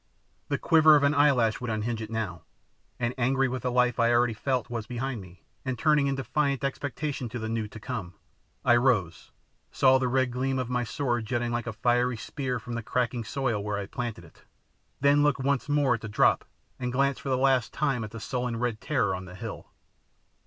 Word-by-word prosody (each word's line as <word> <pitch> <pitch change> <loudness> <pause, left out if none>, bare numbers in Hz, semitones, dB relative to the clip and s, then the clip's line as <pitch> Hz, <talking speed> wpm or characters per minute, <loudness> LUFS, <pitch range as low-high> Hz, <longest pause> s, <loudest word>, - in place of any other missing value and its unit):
The - - +1
quiver 155 -1 +6
of 145 - +3
an 140 +1 +4
eyelash 130 -6 +3
would 120 - -3
unhinge 110 +1 -2
it 110 - -6
now; 110 -7 -3 0.6
and 120 +1 0
angry 135 +2 +2
with 130 -1 -3
the 125 - -1
life 125 0 +2
I 115 0 +4
already 120 0 +3
felt 125 +3 -1
was 115 -2 -5
behind 125 -1 -3
me, 90 -1 -15 0.2
and 130 -1 -3
turning 150 0 +3
in 135 - 0
defiant 140 +1 -1
expectation 140 -1 -3
to 120 - -5
the 110 -1 -4
new 110 -1 -2
to 110 - -11
come, 105 -7 -5 0.5
I 120 - +6
rose, 105 - +1 0.4
saw 130 0 +4
the 130 - 0
red 130 0 +1
gleam 130 +2 -1
of 125 -1 -2
my 125 0 +1
sword 120 -1 -2
jutting 120 0 -1
like 120 0 -2
a 110 - -3
fiery 120 +2 +1
spear 130 +2 -3
from 120 +1 -7
the 120 - -2
cracking 120 +1 -1
soil 120 -3 -2
where 105 0 -2
I - - -2
had 100 - -8
planted 120 -8 -4
it, - - -20 0.6
then 140 +1 +5
looked 145 -2 +2
once 140 +1 0
more 145 -3 +3
at 115 - -3
the 110 - -6
drop 105 - +3 0.3
and 125 -1 -2
glanced 140 +2 +1
for 140 - -5
the 130 - +2
last 130 -3 +2
time 135 -6 0
at 110 - -5
the 115 +2 -8
sullen 125 +1 -3
red 115 -2 -2
terror 125 -10 +1
on 90 0 -5
the 90 0 -11
hill. - - -7
125 Hz, 215 wpm, -27 LUFS, 115-135 Hz, 0.6 s, quiver